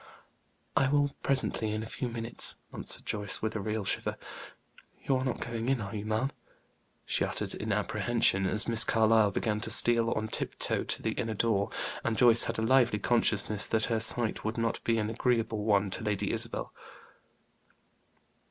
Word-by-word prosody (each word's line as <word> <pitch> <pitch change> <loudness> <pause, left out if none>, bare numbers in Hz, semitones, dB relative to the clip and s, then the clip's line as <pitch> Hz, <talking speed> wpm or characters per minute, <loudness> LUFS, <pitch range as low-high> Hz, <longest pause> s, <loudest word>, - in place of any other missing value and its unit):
"I 135 - +3
will 145 0 +2
presently, 130 -5 0
in 110 +1 -3
a - - -6
few 125 +3 -5
minutes," 115 0 0 0.2
answered - - -3
Joyce, 100 -2 -2
with 110 0 -2
a - - -1
real 105 0 -3
shiver. - - -2 0.9
"You 135 - +1
are 130 - -2
not 130 -3 -2
going 115 +1 -3
in, 135 -2 +1
are 100 0 -6
you, 105 0 -5
ma'am?" 110 +6 -1 0.7
she - - 0
uttered, - - -3
in - - -4
apprehension, 105 -5 +1
as 105 +3 +1
Miss 115 -1 +4
Carlyle 110 -1 +3
began 105 +2 -2
to 115 - -5
steal 115 +1 +5
on 110 0 -3
tip - - -4
toe - - -1
to - - -3
the - - 0
inner 110 -1 -3
door, 100 -2 0 0.3
and 110 -2 -1
Joyce 120 -2 +6
had - - -3
a 110 - -1
lively 120 -2 +3
consciousness 105 -3 +1
that 110 -1 0
her 110 - +1
sight 110 +1 +2
would 110 +2 -3
not 115 0 -2
be 115 -1 +1
an 110 0 -1
agreeable 115 -3 -1
one 100 -2 +2
to 110 - -3
Lady 105 -2 -1
Isabel. - - -2
110 Hz, 180 wpm, -29 LUFS, 105-120 Hz, 0.9 s, Joyce